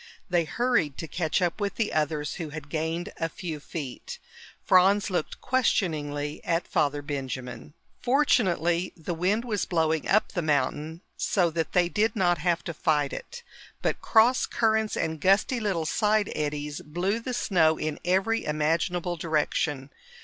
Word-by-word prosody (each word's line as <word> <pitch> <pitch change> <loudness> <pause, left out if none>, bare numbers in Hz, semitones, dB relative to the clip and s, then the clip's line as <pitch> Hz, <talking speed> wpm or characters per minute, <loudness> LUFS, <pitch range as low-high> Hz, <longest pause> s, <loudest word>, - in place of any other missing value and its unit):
They 175 -2 +3
hurried 225 - 0
to 165 - -5
catch 175 +2 0
up 175 +4 -1
with 200 -1 -1
the 220 -2 -1
others, 150 -1 -1
who 165 -4 -5
had 150 -1 -8
gained 160 +2 -3
a 165 - -1
few 170 -5 -6
feet. 145 -3 -7 0.5
Franz 195 +3 +4
looked 175 -4 -2
questioningly 150 - 0
at 170 +1 0
Father 145 0 0
Benjamin. 130 -1 -5 0.3
Fortunately, 185 - +2
the 165 +1 -4
wind 195 +8 0
was 210 -5 -1
blowing 160 -3 0
up 215 +2 +3
the 180 - -2
mountain, 150 +2 -1 0.2
so 175 -4 +1
that 165 0 -2
they 180 -1 +4
did 215 +5 +1
not 175 -4 +2
have 175 +1 0
to 170 - -4
fight 150 -2 +1
it. 480 0 -8 0.4
But - - 0
cross 235 +3 +4
currents 220 -1 +1
and 160 -2 -2
gusty 200 - +3
little 190 -7 -1
side 210 +3 +1
eddies 150 +1 -3
blew 180 +7 -1
the 245 +2 -4
snow 160 -8 +3
in 155 -1 -3
every 195 +5 +1
imaginable 170 +3 0
direction. 150 -3 -1
170 Hz, 155 wpm, -27 LUFS, 150-200 Hz, 0.5 s, Franz